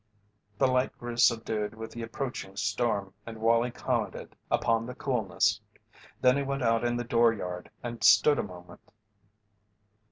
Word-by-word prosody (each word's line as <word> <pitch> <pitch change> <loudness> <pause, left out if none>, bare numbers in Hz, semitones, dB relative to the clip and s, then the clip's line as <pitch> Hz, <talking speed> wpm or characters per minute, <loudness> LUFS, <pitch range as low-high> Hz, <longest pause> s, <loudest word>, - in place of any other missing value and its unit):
The 135 - +3
light 130 0 +1
grew 120 0 -6
subdued 110 -3 +1
with 110 0 -8
the 120 - -7
approaching 115 -4 -5
storm 105 -2 -1
and 115 0 -8
Wallie 115 +2 +3
commented - - -3
upon 115 0 +1
the 125 - -7
coolness. 120 -10 0 0.6
Then 125 +1 +5
he - - 0
went 140 -1 -2
out 115 0 +2
in 120 0 0
the 120 - -2
dooryard 115 -7 +1
and 120 -1 -6
stood 150 -1 +6
a - - +3
moment. 90 -2 -12
115 Hz, 150 wpm, -29 LUFS, 110-125 Hz, 0.6 s, stood